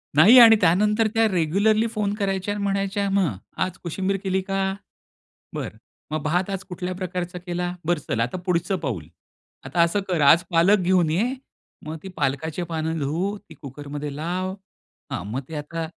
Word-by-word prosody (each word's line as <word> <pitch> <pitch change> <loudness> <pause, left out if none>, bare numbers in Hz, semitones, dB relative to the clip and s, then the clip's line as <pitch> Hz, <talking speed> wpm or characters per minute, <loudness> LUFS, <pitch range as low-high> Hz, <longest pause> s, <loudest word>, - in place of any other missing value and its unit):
नाही 200 - +8
आणि 225 -2 +10
त्यानंतर 210 +6 +3
त्या 225 -1 +4
रेग्युलरली 200 +6 +2
फोन 210 -2 -1
करायच्या 195 -1 -1
आणि 205 0 -4
म्हणायच्या 200 0 0
मग 195 -4 +2 0.3
आज 185 -1 -4
कोशिंबीर 190 +3 -1
केली 190 0 0
का? 195 0 -1 0.8
बरं - - -5 0.3
मग 155 -1 -2
भात 180 +5 0
आज 195 -1 -4
कुठल्या 180 0 -4
प्रकारचा 180 -1 -4
केला? 175 0 -3
बरं 175 -1 +1
चल 115 - 0
आता 120 +9 -1
पुढचं 180 +2 +1
पाऊल. 120 - -3 0.6
आता 175 - -1
असं 170 +5 +2
कर 175 -4 0
आज 150 +4 +6
पालक 180 +5 +5
घेऊन 180 -3 +2
ये. 230 +11 +1 0.5
मग 160 +1 -4
ती 190 - -7
पालकाची 150 +5 -1
पानं 160 -1 -2
धुव, 170 +9 -1
ती 205 - -15
कुकरमध्ये 145 +1 -7
लाव. 180 +4 -2 0.6
हां, - - -3
मग 130 - -1
ते 160 - -7
आता 160 +2 -4
180 Hz, 170 wpm, -24 LUFS, 160-195 Hz, 0.8 s, आणि